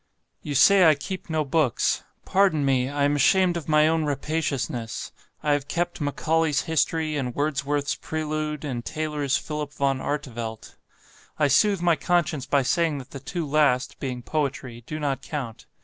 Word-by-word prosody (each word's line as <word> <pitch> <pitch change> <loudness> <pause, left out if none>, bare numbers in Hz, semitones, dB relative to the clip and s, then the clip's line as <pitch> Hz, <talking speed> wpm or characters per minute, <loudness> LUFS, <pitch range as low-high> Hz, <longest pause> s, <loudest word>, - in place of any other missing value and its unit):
"You 145 - -4
say 195 +7 +6
I 155 - +5
keep 185 +6 -7
no 155 -1 0
books; 145 -4 +1 0.2
pardon 185 -7 +3
me 130 -1 +2
I 145 0 -1
am 145 +1 +3
ashamed 180 +4 +4
of 165 -2 -5
my 155 0 +5
own 160 0 +1
rapaciousness 145 -5 -2 0.3
I 150 - +3
have 145 -1 -1
kept 175 +1 -2
'Macaulay's 155 +1 +1
History,' 160 -1 0
and 125 -4 -3
Wordsworth's 145 -1 0
'Prelude', 155 -1 -3
and 125 -4 -3
Taylor's 150 -2 -1
'Philip 150 -2 -5
Van 135 -1 0
Artevelde.' 120 -7 -4 0.7
I 150 - +3
soothe 195 - +3
my 170 -2 +4
conscience 170 -6 0
by 140 -1 +2
saying 165 +2 +1
that 130 -2 -9
the 140 - -7
two 170 +5 -4
last, 140 -3 +1
being 125 -3 -4
poetry 135 -5 -3
do 155 - -4
not 140 -3 -1
count. 135 -7 -6
150 Hz, 165 wpm, -25 LUFS, 135-160 Hz, 0.7 s, say